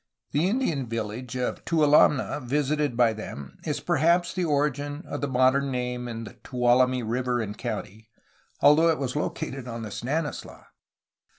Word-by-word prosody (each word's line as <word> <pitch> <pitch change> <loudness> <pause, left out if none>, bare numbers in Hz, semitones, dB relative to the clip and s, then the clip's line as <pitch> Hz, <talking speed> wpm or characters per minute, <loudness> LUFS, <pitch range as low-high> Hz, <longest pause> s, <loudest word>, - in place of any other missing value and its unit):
The 160 +6 +2
Indian 170 - 0
village 115 +2 -4
of 125 - -2
Tualamne, 150 -3 +3
visited 145 0 0
by 120 -2 +4
them, 70 -10 -8
is - - -1
perhaps 170 +4 +2
the 185 - -1
origin 145 0 -1
of 145 - -5
the 145 - 0
modern 130 +1 +3
name 125 -1 -3
in 115 -3 -7
Tuolumne 125 0 +2
River 125 +1 0
and 105 -2 -4
County, 110 +2 -6 0.5
al 145 +1 +9
though 165 +2 +4
it 160 - +2
was 130 -1 -3
located 135 -3 -3
on 115 -1 -5
the 110 - -6
Stanislaus. 145 +8 -4
130 Hz, 155 wpm, -26 LUFS, 120-150 Hz, 0.5 s, al